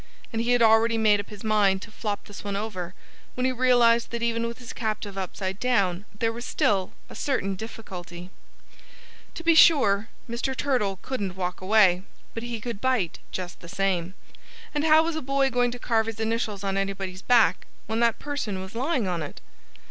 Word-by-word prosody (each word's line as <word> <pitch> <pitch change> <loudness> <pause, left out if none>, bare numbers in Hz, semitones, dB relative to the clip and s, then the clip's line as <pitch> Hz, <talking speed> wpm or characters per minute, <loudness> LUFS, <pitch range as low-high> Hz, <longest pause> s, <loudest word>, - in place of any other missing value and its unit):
And 225 - 0
he 240 +1 +2
had 245 -1 +4
already 225 +1 +5
made 215 -2 +4
up 205 - -6
his 210 -2 -10
mind 205 -3 +2
to - - -11
flop 210 -2 -4
this 205 - -10
one 200 -1 -3
over 185 -4 -4 0.4
when 250 - -1
he 260 - +2
realized 245 -2 +4
that 235 0 -4
even 230 0 0
with 235 - -6
his 245 -2 -9
captive 215 -3 -3
upside 190 0 -4
down 200 -7 +1
there 225 +1 0
was 235 +1 -6
still 195 -6 +1
a - - -12
certain 195 -9 -1
difficulty. 185 -4 -8 1.0
To 335 - -7
be 335 0 +5
sure, 230 -10 +5 0.2
Mr. 250 +3 -3
Turtle 210 -9 0
couldn't 200 -9 -3
walk 180 -1 -3
away. 190 -2 +4 0.3
But 230 - -4
he 235 -1 -4
could 230 -2 -6
bite 250 -10 0
just 180 -1 -6
the 170 - -12
same. 185 -1 -1 0.6
And 295 +1 0
how 315 0 +6
was 330 0 -2
a 315 - -2
boy 275 0 +1
going 245 0 +2
to 245 - -6
carve 225 -2 +1
his 225 -1 -5
initials 220 -3 -1
on 195 0 -1
anybody's 195 -1 -3
back, 240 0 +3 0.2
when 220 +1 -2
that 235 -1 +3
person 265 -10 -3
was 190 +1 -8
lying 255 - 0
on 175 -2 -1
it? 150 - -7
220 Hz, 195 wpm, -26 LUFS, 195-245 Hz, 1.0 s, how